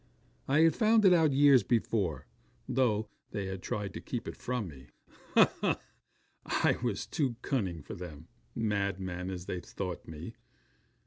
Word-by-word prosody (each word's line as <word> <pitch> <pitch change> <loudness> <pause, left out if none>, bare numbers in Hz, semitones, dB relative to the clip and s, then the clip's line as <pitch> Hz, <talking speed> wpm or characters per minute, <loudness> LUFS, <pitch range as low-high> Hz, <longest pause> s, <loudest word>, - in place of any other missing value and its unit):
I 145 +3 +4
had 165 0 +5
found 220 -1 +4
it 185 - +8
out 160 -4 +4
years 140 -2 +6
before, 105 -8 0 0.4
though 110 -4 +1 0.2
they 100 -1 -3
had 95 -1 -5
tried 100 -1 -3
to 110 - -6
keep 120 -2 -4
it - - -5
from 125 -5 -3
me. 70 -4 -12 0.5
Ha! - - +6
ha! - - +1 0.6
I - - +2
was 115 -5 -1
too 135 -7 -1
cunning 95 - -1
for - - -8
them, 80 -3 -9 0.3
madman 100 -4 -1
as 90 -2 -5
they 90 - -3
thought 90 0 -6
me. 80 +7 -7
105 Hz, 155 wpm, -31 LUFS, 90-130 Hz, 0.6 s, it